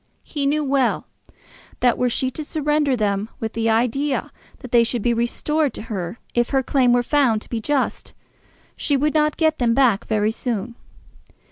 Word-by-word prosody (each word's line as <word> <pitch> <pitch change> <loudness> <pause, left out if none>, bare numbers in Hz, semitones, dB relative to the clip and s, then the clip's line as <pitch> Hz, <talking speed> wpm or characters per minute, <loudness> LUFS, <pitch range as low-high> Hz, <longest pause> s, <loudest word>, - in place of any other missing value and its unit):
He 285 -2 -2
knew 300 +2 +1
well 270 -2 +1 0.7
that 245 -1 +3
were 250 - +1
she 260 +2 -1
to 310 - -6
surrender 295 -3 0
them 205 0 -1
with 225 0 -4
the 230 0 0
idea 250 +5 0 0.3
that 255 -3 -9
they 240 -2 +5
should 230 -1 -2
be 240 - +2
restored 280 +5 0
to - - -6
her 180 +2 -4 0.2
if 240 0 +1
her 270 -1 +1
claim 255 -2 +2
were 245 0 +3
found 245 -6 +2
to - - -19
be 230 -2 -3
just, 280 +3 -2 0.6
she 285 - 0
would 295 +2 +1
not 305 -1 +2
get 315 -1 +2
them 235 -2 +2
back 240 -6 +3
very 215 0 +1
soon. 230 -1 -3
250 Hz, 180 wpm, -21 LUFS, 230-285 Hz, 0.7 s, they